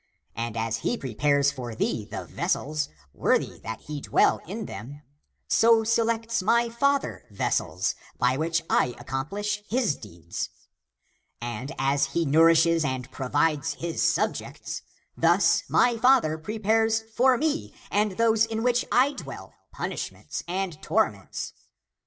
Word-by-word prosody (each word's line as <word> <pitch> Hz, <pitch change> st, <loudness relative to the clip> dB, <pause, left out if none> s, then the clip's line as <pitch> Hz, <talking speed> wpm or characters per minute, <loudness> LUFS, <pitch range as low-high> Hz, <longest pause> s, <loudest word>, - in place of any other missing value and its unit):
And 115 Hz, -1 st, -3 dB
as 115 Hz, 0 st, -1 dB
he 240 Hz, -, -1 dB
pre 130 Hz, -, -6 dB
pares 140 Hz, +3 st, +3 dB
for 125 Hz, -5 st, -6 dB
thee 110 Hz, -1 st, -1 dB
the 110 Hz, -, -5 dB
vessels, 155 Hz, -3 st, -1 dB, 0.2 s
worthy -, -, +1 dB
that 110 Hz, 0 st, -6 dB
he 150 Hz, -1 st, -6 dB
dwell -, -, +3 dB
in 210 Hz, +4 st, -5 dB
them, 145 Hz, +6 st, -8 dB, 0.4 s
so 225 Hz, 0 st, +5 dB
selects 230 Hz, 0 st, +1 dB
he 185 Hz, -, -4 dB
(my 235 Hz, +1 st, +4 dB
father) 280 Hz, +4 st, 0 dB
vessels, 100 Hz, -, -1 dB, 0.2 s
by 125 Hz, +1 st, +2 dB
which 165 Hz, +3 st, 0 dB
I 125 Hz, -, +2 dB
accomplish 200 Hz, +10 st, -3 dB
his 230 Hz, -, +1 dB
deeds. 85 Hz, -8 st, -6 dB, 0.9 s
And 120 Hz, +3 st, -5 dB
as 135 Hz, +1 st, +2 dB
he 170 Hz, -, +2 dB
nourishes 165 Hz, +2 st, +5 dB
and 130 Hz, -2 st, -3 dB
provides 145 Hz, +2 st, 0 dB
his 170 Hz, -1 st, -3 dB
subjects, -, -, -1 dB, 0.3 s
thus -, -, +4 dB
he -, -, -11 dB
(my 240 Hz, -1 st, +3 dB
father) 245 Hz, -10 st, +4 dB
prepares 220 Hz, +4 st, +1 dB, 0.2 s
for 255 Hz, 0 st, +5 dB
me 310 Hz, +2 st, -1 dB, 0.2 s
and 210 Hz, -1 st, +2 dB
those 225 Hz, +1 st, +3 dB
in 225 Hz, 0 st, -3 dB
which 245 Hz, 0 st, +2 dB
I 260 Hz, +3 st, +4 dB
dwell -, -, -9 dB, 0.2 s
punishments -, -, -5 dB
and 180 Hz, -3 st, -3 dB
torments. -, -, -1 dB
165 Hz, 140 wpm, -26 LUFS, 135-225 Hz, 0.9 s, so